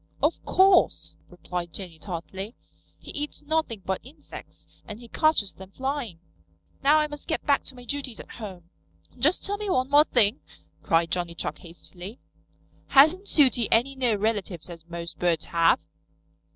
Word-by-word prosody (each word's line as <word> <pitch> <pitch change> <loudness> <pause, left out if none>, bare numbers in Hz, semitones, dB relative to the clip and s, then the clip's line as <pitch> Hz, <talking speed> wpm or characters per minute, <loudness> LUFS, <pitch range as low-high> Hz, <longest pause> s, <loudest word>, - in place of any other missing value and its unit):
"Of - - +1
course," 380 -1 +4
replied 180 -1 -6
Jenny 175 -5 -8
tartly. 190 +5 -6 0.4
"He - - -11
eats 295 0 -5
nothing 290 -9 -1
but 190 0 -2
insects, 265 +6 -13 0.2
and 210 0 -8
he 240 - -12
catches 270 - +2
them 190 0 -12
flying. 265 - -4 0.6
Now 290 +3 +5
I 305 - +3
must 295 -1 -9
get 320 - -2
back 280 -2 +3
to 265 - -9
my 245 -1 -12
duties 275 -4 -4
at - - -11
home." 180 -5 -9 0.5
"Just 310 +6 +2
tell 405 +1 -1
me 415 -1 -4
one 260 -6 +1
more 295 +1 +7
thing," 225 -4 +3 0.4
cried 165 0 +2
Johnny 175 -1 -2
Chuck 150 -2 -4
hastily. 175 +5 -11 0.7
"Hasn't 315 +9 +5
Sooty 255 -6 +4
any 245 +5 +3
near 250 -5 +1
relatives 200 -5 -2
as 165 0 -12
most 170 0 -6
birds 170 -3 +1
have?" 165 0 +3
225 Hz, 160 wpm, -26 LUFS, 175-285 Hz, 0.7 s, more